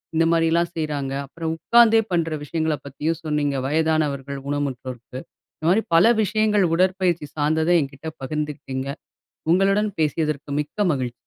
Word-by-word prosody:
இந்த 165 +1 +3
மாதிரி 165 -1 +3
எல்லாம் 170 +1 +1
செய்றாங்க. 145 -4 -2
அப்புறம் 160 +3 -4
உட்கார்ந்தே 225 +4 +5
பண்ணுற 165 -2 0
விஷயங்களைப் 155 -1 -2
பத்தியும் 155 +4 -2
சொன்னீங்க. 150 -2 0
வயதானவர்கள் 145 -3 0
ஊனமுற்றோருக்கு. 130 -3 -4 0.4
இந்த 155 - -8
மாதிரி 210 +5 +3
பல 170 +4 +6 0.2
விஷயங்கள் 210 -1 +2
உடற்பயிற்சி 180 -3 +1
சார்ந்தத 155 +2 +1
எங்கிட்ட 140 +2 -7 0.2
பகிர்ந்துகிட்டீங்க. 140 -2 -4 0.7
உங்களுடன் 195 +3 +3
பேசியதற்கு 150 -1 -1
மிக்க 150 - -19
மகிழ்ச்சி. 130 -4 -2
155 Hz, 130 wpm, -23 LUFS, 140-170 Hz, 0.7 s, பல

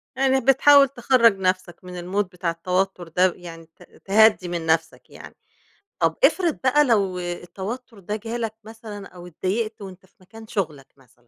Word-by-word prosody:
يعني 265 0 +2
بتحاول 275 +2 +6
تخرّج 240 -4 +3
نفْسَك 185 -1 -2
من 180 0 -10
الMood 195 +4 -1
بتاع 180 -1 -4
التوتر 180 +1 -2
ده، 180 +2 +2
يعني 165 -2 -11
ت 165 - -21 0.2
تهدِّي 210 -2 +4
من 170 -2 -4
نفْسَك 160 0 -1
يعني، - - -13 0.6
طَب - - +1
افرض 345 -5 +3
بقى 295 +3 +4
لو 200 -7 +1
التوتر 190 +7 -7
ده 205 +2 -4
جالك 225 0 -4
مثلًا 215 -2 -10
أو 175 -1 -13
اتضايقت 210 +6 -3
وأنت 190 -1 -11
في 195 - -35
مكان 220 +4 -14
شُغْلك 160 - -4
مثلًا؟ 130 -2 -25
195 Hz, 160 wpm, -23 LUFS, 175-230 Hz, 0.6 s, بتحاول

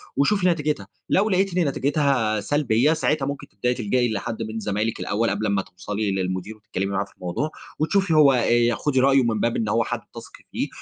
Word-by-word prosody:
وشوفي 185 +6 +2
نتيجتها. 150 - 0 0.2
لو 205 +3 +3
لقيتِ 190 -1 +1
إن 175 -4 +2
نتيجتها 135 -6 +1
سلبية، 140 +3 +2
ساعتها 150 -3 0
ممكن 140 0 -5
تبدأي 125 +5 -1
تلجأي 120 +1 0
لحد 110 +2 -4
من 110 0 -5
زمايلِك 105 +1 -2
الأول 115 +3 0
قبل 105 +2 -1
ما 100 -1 +1
توصلي 100 +3 -4
للمدير 95 +2 -3
وتتكلمي 105 -2 -4
معاه 100 0 -1
في - - -22
الموضوع، 90 - -3 0.3
وتشوفي 180 +3 +1
هو 150 -3 +6
آآ، 120 -1 +3
خُدي 135 -3 0
رأيه 135 0 +4
من 115 -2 0
باب 115 +2 0
إن 110 -2 -1
هو 115 +2 +2
حد - - -3 0.2
تثقي - - -11
فيه - - -2
120 Hz, 195 wpm, -23 LUFS, 105-145 Hz, 0.3 s, هو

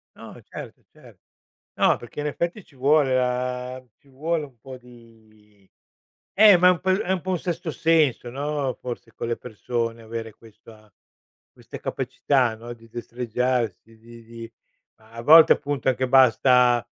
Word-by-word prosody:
No, - - -12
certo, - - -11
certo. - - -19 0.6
No, - - +4
perché 120 +4 -9
in 150 - -3
effetti 170 +6 -3
ci 140 - -24
vuole 140 0 +3
la 125 0 -2 0.2
ci 140 - -28
vuole 155 +4 -2
un 130 -5 -16
po' 130 +2 -11
di 110 -5 -21 0.7
Eh, 210 -2 +8
ma 180 +1 +5
è - - +7
un 175 - -5
po 190 - -1
è 190 0 0
un 185 - -1
po' 185 - -5
un 185 - 0
sesto 170 -1 -4
senso 155 -7 +1
no, 140 0 -3
forse 120 -2 -8
con - - -5
le 120 - -1
persone 115 0 -4
avere 115 0 -7
questa 110 -1 -19 0.6
queste - - -11
capacità 130 -2 -1
no, 120 +2 -9
di 115 0 -19
destreggiarsi, 120 -2 -3
di 115 0 -15
di 115 0 -11 0.5
a 115 +1 -11
volte 160 +4 +8
appunto 145 -2 -3
anche 130 0 0
basta 125 -1 +4
125 Hz, 160 wpm, -23 LUFS, 115-145 Hz, 0.7 s, Eh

